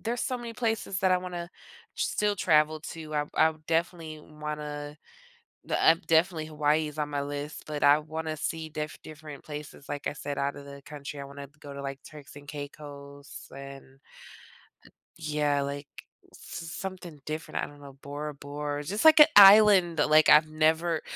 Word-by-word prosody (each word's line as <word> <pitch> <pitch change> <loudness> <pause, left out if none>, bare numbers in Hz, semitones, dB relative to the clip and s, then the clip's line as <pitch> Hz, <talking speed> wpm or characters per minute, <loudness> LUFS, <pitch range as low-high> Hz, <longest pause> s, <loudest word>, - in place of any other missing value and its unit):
there's 235 +2 -3
so 255 -2 -2
many 235 -1 -7
places 225 -5 -2
that 185 -1 +3
I 180 - +3
wanna 175 -1 -6 0.5
still 210 -1 0
travel 155 -2 +3
to. 155 -2 -8
I 150 0 +1
I 160 - +4
definitely 165 -2 -2
wanna 150 -1 -7 0.7
the, - - -1
uh 165 - +7
definitely 160 -1 +2
Hawaii 155 0 +1
is 150 - -13
on 150 - 0
my 145 -1 -2
list, 145 +1 -6
but 150 -1 -3
I 145 +1 +6
wanna 155 +1 -5
see 160 +1 -3
diff 150 0 -5
different 150 -2 -10
places, 150 -1 -9
like 145 0 -3
I - - -3
said, 145 -1 -5
outta 140 +1 -2
the 140 0 -11
country. 145 -1 -8
I - - -7
wanna 140 0 -9
go 140 -1 -9
to, 140 - -7
like, 135 0 -6
Turks 145 -2 -13
and 145 0 -13
Caicos 145 -1 -9
and, 140 0 -9 1.4
eh - - -16
yeah, 150 -2 0
like, 140 0 -5 0.5
s - - -15 0.4
something 180 -5 -7
different. 155 0 -4
I - - -3
don't 145 0 -15
know, 140 -1 -11
Bora 145 +1 -6
Bora. 145 +1 -5
Just 205 +6 -2
like 315 -1 +8
a 300 - +10
island 195 -4 +8
that, 150 - +2
like, 155 0 +6
I've 155 +1 +7
never 160 +1 +1
150 Hz, 180 wpm, -28 LUFS, 145-165 Hz, 1.4 s, a